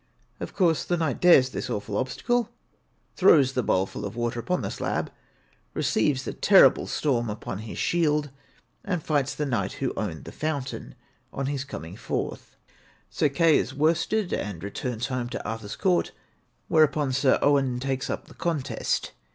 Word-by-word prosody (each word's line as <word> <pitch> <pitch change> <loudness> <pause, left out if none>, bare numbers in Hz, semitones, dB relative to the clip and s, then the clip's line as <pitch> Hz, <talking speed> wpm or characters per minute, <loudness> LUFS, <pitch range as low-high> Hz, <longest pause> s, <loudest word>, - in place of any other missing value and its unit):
' - - -39
Of - - -6
course 170 -5 +2
the 175 - 0
knight 160 -6 -1
dares 135 -8 +6
this - - -4
awful 105 -2 -3
obstacle, 230 - 0 0.7
throws 145 -8 +5
the 125 - +1
bowlful 95 -4 -1
of 100 +1 -5
water 120 0 -2
upon 180 +9 -1
the - - -3
slab, - - -2 0.6
receives 135 +3 +1
the - - -4
terrible - - +5
storm 120 -6 0
upon 105 -2 -5
his 110 0 -7
shield, 150 -4 +1 0.5
and 180 -5 -2
fights 145 -3 0
the 150 - -1
knight 115 -8 -1
who 135 - -2
owned 80 -9 -4
the - - -9
fountain, 145 -4 -4 0.4
on 135 - -3
his 140 0 -2
coming 85 - -8
forth. 115 - -4 0.6
Sir 150 - +2
Kai 165 +4 +3
is 145 - +2
worsted, 170 +7 +1
and 95 -5 -3
returns 115 +3 -3
home 125 -2 -3
to 120 - -5
Arthur's 110 -1 -5
court; 180 -2 +1 0.5
whereupon 150 -3 +3
Sir 135 0 +3
Owain 135 -3 +3
takes 135 0 -2
up - - -3
the - - -15
contest. 165 -6 -2
135 Hz, 165 wpm, -26 LUFS, 120-155 Hz, 0.7 s, dares